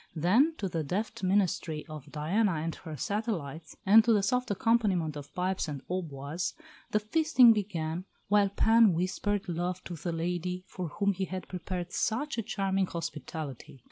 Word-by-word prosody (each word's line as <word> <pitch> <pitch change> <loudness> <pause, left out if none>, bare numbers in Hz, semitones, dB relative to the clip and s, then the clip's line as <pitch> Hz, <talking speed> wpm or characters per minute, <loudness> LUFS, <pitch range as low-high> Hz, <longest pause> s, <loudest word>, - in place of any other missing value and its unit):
Then, 225 - +3
to 195 - -2
the 165 -3 -2
deft 195 +10 -3
ministry 185 -5 +1
of 155 -3 -10
Diana 185 +7 +1
and 160 +1 -2
her 160 -4 -8
satellites, 165 - -3
and 215 +3 +8
to 235 - +3
the 205 -2 +3
soft 250 +4 +1
accompaniment 200 -7 +1
of 145 0 -8
pipes 185 0 -1
and 145 -3 -5
hautboys, 165 -2 -3 0.3
the 210 - +2
feasting 250 +1 +5
began, 180 -4 -3 0.2
while 205 0 +4
Pan 220 0 +5
whispered 190 +4 -1
love 175 +1 -2
to 180 - -7
the 170 +2 -4
lady 180 +2 -2
for 180 -2 -5
whom 200 +6 0
he 190 +1 -2
had 185 0 -6
prepared 180 0 -5
such 240 +4 -1
a - - +2
charming 195 -3 0
hospitality. 155 -5 -6
185 Hz, 165 wpm, -30 LUFS, 165-205 Hz, 0.3 s, and